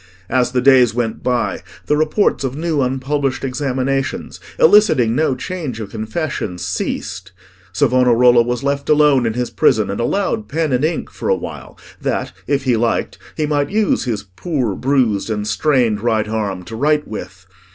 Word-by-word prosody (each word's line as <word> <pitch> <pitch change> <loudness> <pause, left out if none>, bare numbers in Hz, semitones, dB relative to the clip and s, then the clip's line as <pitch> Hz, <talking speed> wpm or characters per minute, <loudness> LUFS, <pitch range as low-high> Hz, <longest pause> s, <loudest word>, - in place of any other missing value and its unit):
As 125 0 +2
the 125 0 +1
days 125 -3 +5
went 115 -2 -2
by, 125 -2 -1 0.2
the 150 - +2
reports 155 +3 +1
of 135 -1 -2
new 160 -1 -1
unpublished 135 +1 -1
examinations, 135 0 -2 0.2
eliciting 160 - +5
no 150 -3 +1
change 145 -4 -5
of 105 -3 -7
confessions, 110 - -4
ceased; 95 +1 -4 0.4
Savonarola 125 -2 +4
was 120 +2 -2
left 140 0 -2
alone 145 -5 +4
in 110 - -1
his 120 0 -3
prison 105 -1 +2
and 100 - -4
allowed 200 - -1
pen 160 0 -1
and 125 +3 +1
ink 160 +1 -1
for - - -4
a - - +4
while, - - -8 0.2
that, - - -2
if 140 0 0
he 125 -3 +2
liked, 115 +1 -1 0.2
he 155 - 0
might 145 -1 0
use 210 -7 +1
his 110 -5 -2
poor 120 - -3
bruised 125 -4 0
and 105 -1 -2
strained 115 -1 +1
right 110 -2 +1
arm 105 -4 -3
to 110 +5 -8
write 150 +4 +1
with. 95 -3 -8
125 Hz, 165 wpm, -18 LUFS, 110-145 Hz, 0.4 s, days